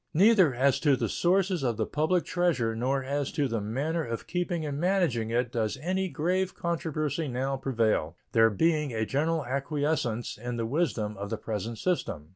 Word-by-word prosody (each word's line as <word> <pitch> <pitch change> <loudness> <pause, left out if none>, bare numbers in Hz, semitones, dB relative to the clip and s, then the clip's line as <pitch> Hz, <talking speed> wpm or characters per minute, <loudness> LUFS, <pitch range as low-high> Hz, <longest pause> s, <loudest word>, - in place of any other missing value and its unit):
Neither 190 - +5
as 135 +2 +3
to 145 -3 +4
the - - -1
sources 185 -1 +1
of 120 -5 0
the - - 0
public 160 +4 +1
treasure 160 -11 +1
nor 130 +4 0
as 140 +1 -2
to 145 -2 +1
the 115 -3 -2
manner 145 +10 -1
of 115 -4 -5
keeping 175 -2 -2
and 145 -1 -3
managing 170 - +1
it 120 +1 0
does 110 -2 -1
any 185 +5 -1
grave 180 +4 0
controversy 160 -2 -2
now 135 +2 -1
prevail, 110 - 0
there 115 -1 +5
being 150 - +1
a 110 -1 0
general 155 +4 0
acquiescence 140 -4 -1
in 120 +1 -4
the 115 - -1
wisdom 115 -6 -1
of 100 +1 -5
the 110 - -2
present 110 +1 -4
system. 85 - -2
140 Hz, 180 wpm, -28 LUFS, 115-165 Hz, -, Neither